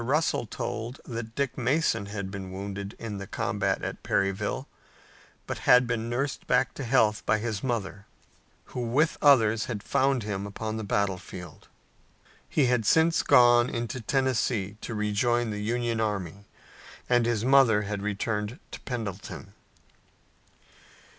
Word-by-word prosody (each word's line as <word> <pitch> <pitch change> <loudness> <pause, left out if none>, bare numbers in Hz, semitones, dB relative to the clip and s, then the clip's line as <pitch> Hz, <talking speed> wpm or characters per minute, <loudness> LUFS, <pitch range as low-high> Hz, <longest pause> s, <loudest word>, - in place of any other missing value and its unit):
Russell 140 -2 +1
told 120 0 -5
that 115 -2 -6
Dick 140 -2 -1
Mason 125 -5 +1
had 100 -2 -5
been 95 -2 -6
wounded 100 +1 -6
in 105 -3 -5
the 100 - -7
combat - - -1
at - - -4
Perryville, 100 +7 -1 0.8
but - - -4
had 125 0 +8
been 115 -1 -2
nursed 135 +4 -2
back 125 -2 +2
to 140 - -6
health 110 -4 +2
by 110 - +4
his 110 -1 -3
mother, 105 -5 -3 0.7
who - - -3
with 130 +7 +1
others 115 -6 +5
had 110 -4 -5
found 135 -3 +1
him 100 -1 -3
upon 110 +2 -4
the 100 -3 0
field. 90 -3 -10 0.8
He 145 - +3
had 125 -2 +2
since 160 +8 +4
gone 120 0 +6
into 120 +1 -4
Tennessee 120 -6 0
to 115 - -5
rejoin 110 +3 +1
the 105 0 -4
Union 115 +1 -1
army, 100 -2 -3 0.6
and 120 -1 +3
his 115 -1 0
mother 130 -6 +5
had 105 0 -4
returned 105 +3 -2
to - - -7
Pendleton. 105 -6 -6
115 Hz, 140 wpm, -27 LUFS, 105-125 Hz, 0.8 s, had